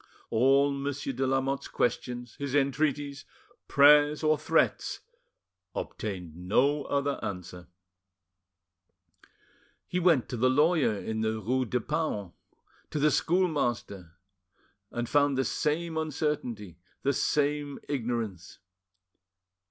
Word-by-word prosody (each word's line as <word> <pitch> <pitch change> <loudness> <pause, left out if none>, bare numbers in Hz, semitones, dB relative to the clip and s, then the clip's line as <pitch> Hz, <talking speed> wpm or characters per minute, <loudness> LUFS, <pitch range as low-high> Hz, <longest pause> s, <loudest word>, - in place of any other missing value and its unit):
All 135 +5 +4
Monsieur 140 0 -3
de 130 +1 -1
Lamotte's 135 +1 0
questions, 120 -1 -2
his 140 -1 -3
entreaties, 145 0 0 0.4
prayers, 145 +2 +6
or 155 0 +4
threats, 150 - 0 0.7
obtained 90 -7 -5
no 135 - +1
other 140 0 -1
answer. 90 -2 -6 2.2
He 180 - -2
went 165 -8 +3
to 125 - -4
the 130 +3 +3
lawyer 150 -3 +3
in 110 +2 -3
the 110 0 -1
rue 130 +4 0
de 125 +2 -1
Paon, 120 - -2 0.6
to - - -4
the 150 +1 +3
schoolmaster, 120 - 0 0.7
and 120 0 -3
found 145 0 +2
the 135 - +1
same 160 +2 -1
uncertainty, 135 - -3 0.2
the 140 - +2
same 145 +1 0
ignorance. 115 - -3
135 Hz, 105 wpm, -29 LUFS, 115-145 Hz, 2.2 s, prayers